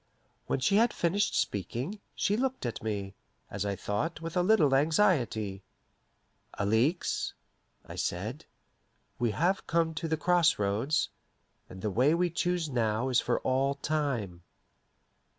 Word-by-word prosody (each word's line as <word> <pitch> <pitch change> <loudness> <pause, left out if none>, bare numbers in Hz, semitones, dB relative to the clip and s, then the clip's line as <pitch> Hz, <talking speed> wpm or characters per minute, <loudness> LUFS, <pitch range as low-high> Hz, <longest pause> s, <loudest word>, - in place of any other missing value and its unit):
When - - 0
she 195 +10 +3
had 230 +1 +4
finished 195 +5 +1
speaking, 120 - -2 0.2
she 205 - +1
looked 260 - -1
at 120 - -3
me, 100 -3 -3 0.4
as 100 0 -2
I 100 - -1
thought, 105 - -2
with 165 +1 -6
a 180 - +3
little 175 -8 +4
anxiety. 135 - +2 0.9
"Alixe," 110 - 0 0.5
I - - -9
said, 110 - -3 0.7
"we 120 0 +2
have 175 - 0
come 165 -1 +1
to 160 +1 -3
the 160 0 0
cross 175 0 +3
roads, 105 +10 0 0.6
and 95 0 -10
the 105 - 0
way 130 - +3
we 175 0 +1
choose 175 0 0
now 115 -2 0
is 125 -2 +4
for 120 - 0
all 135 +2 +1
time." 140 - -2
140 Hz, 140 wpm, -30 LUFS, 110-170 Hz, 0.9 s, had